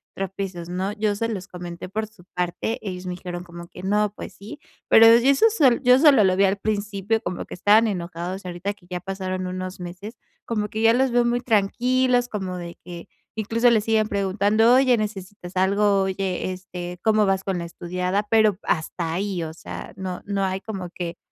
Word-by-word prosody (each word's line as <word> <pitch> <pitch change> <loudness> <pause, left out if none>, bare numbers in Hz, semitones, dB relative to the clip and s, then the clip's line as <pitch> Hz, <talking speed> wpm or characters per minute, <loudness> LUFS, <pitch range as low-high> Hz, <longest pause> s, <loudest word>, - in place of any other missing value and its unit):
tropiezos", 190 -3 -5
¿no? 185 +3 -2
Yo 210 -1 0
se 230 +3 -1
los 200 -4 -5
comenté 175 -1 -8
por 215 +3 -2
su 215 -4 -19
parte, 180 +6 -2
ellos 180 0 -5
me 180 - -3
dijeron 175 0 -6
como 170 -1 -10
que: 180 - -11
"No, 205 +2 +1
pues - - -8
sí", 220 +10 -10 0.3
pero 225 0 +8
yo 230 - +9
eso 280 +11 +5
sol 275 - +3
yo 250 0 +6
solo 275 -6 +6
lo 185 -1 +3
vi 200 - +4
al 195 +1 +2
principio, 205 +1 -1
como 185 - -4
que - - -8
estaban 215 +5 +4
enojados. 180 0 -4
Ahorita 180 +3 -4
que 195 - -24
ya 180 -1 -4
pasaron 185 0 -4
unos 185 +1 -5
meses, 180 +6 -8 0.3
como 210 -3 -1
que 220 +2 -3
ya 225 0 +6
los 260 +2 +2
veo 240 0 +3
muy 240 0 +1
tranquilos, 245 +3 +2
como 190 -3 -4
de 170 -1 -8
que 175 -1 -9 0.3
incluso 230 +3 +2
le 220 -2 +3
siguen 220 0 +1
preguntando: 205 +4 +3
"Oye, 260 -1 +5
necesitas 195 -3 -6
algo, 200 +1 +3
oye, 190 -1 -2
este, 180 -1 -7
¿cómo 215 -1 +4
vas 195 -1 +1
con 190 -2 -2
la 170 - -4
estudiada?". 180 +3 -2
Pero 215 -4 +3
hasta 165 0 -2
ahí, 190 0 -2
o 160 -1 -5
sea, - - -8
no 185 -2 -5
no 200 -1 -1
hay 190 +1 -2
como 190 -5 -6
que, 170 -1 -5
195 Hz, 200 wpm, -23 LUFS, 180-220 Hz, 0.3 s, yo